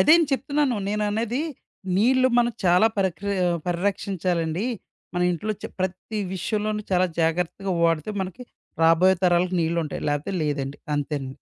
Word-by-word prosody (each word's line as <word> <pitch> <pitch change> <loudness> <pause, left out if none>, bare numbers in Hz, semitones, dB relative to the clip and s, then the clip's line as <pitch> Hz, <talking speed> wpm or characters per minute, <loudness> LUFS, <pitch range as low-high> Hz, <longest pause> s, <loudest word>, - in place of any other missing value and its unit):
అదేను 330 +2 +6
చెప్తున్నాను. 285 -2 +1
నేననెది 210 +5 -1 0.5
నీళ్ళు 255 +5 +4
మనం 240 0 +3
చాలా 180 +4 +5
పరక్రియ 195 +1 0 0.3
పరిరక్షించాలండి. 180 -1 -1 0.5
మన 180 - 0
ఇంట్లో 210 +5 -2
చ - - -8 0.2
ప్రతి 190 +4 -3 0.2
విషయంలోనూ 210 +2 -2
చాలా 185 0 +4
జాగ్రత్తగా 175 +4 0
వాడితే 165 +2 +2
మనకి 190 +5 -7 0.4
రాబోయే 165 +3 +5
తరాలకి 180 +1 +3
నీళ్ళుంటాయి. 165 -2 -1
లేపోతే 145 +6 -1
లేదండి. 140 -2 -2 0.2
అంతేనండి. 140 -2 -3
185 Hz, 120 wpm, -24 LUFS, 165-215 Hz, 0.5 s, అదేను